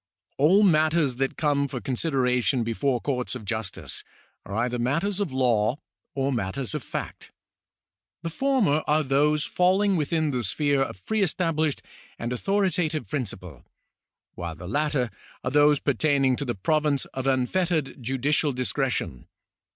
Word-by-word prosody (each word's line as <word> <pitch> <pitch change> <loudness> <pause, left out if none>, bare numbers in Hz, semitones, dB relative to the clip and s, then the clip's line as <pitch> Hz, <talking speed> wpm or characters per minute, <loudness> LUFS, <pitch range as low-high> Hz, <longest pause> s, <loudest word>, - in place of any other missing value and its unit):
All 180 +9 +5
matters 155 -6 +3
that 135 0 -1
come 145 -2 +1
for 130 -2 -5
consideration 125 -2 +1
before 120 +3 0
coiu'ts 125 -1 -2
of 115 -4 -7
justice 110 -2 -4 0.4
are 100 - -5
either 120 +2 0
matters 165 +12 0
of 200 -8 -1
law 120 -2 +2 0.4
or 135 0 0
matters 115 +1 -3
of - - -2
fact. - - -6 0.9
The 165 - -3
former 220 - +2
are 155 +1 +3
those 150 +2 +2
falling 190 +4 +2
within 155 0 0
the 125 -2 -1
sphere 140 +7 +1
of 95 -8 -4
pre 220 -1 0
established 160 -4 0 0.3
and 120 +2 -3
authoritative 180 - 0
principle, 95 - -5 0.7
while 85 -2 -5
the 90 +3 -9
latter 140 0 0 0.3
are 125 - -1
those 145 +1 +5
pertaining 140 -1 +2
to 145 - -3
the 120 - -2
province 150 +6 +1
of 130 0 -3
unfettered 145 +2 0
judicial 135 +3 0
discre 130 +2 0
tion. 65 - -4
140 Hz, 145 wpm, -26 LUFS, 125-155 Hz, 0.9 s, All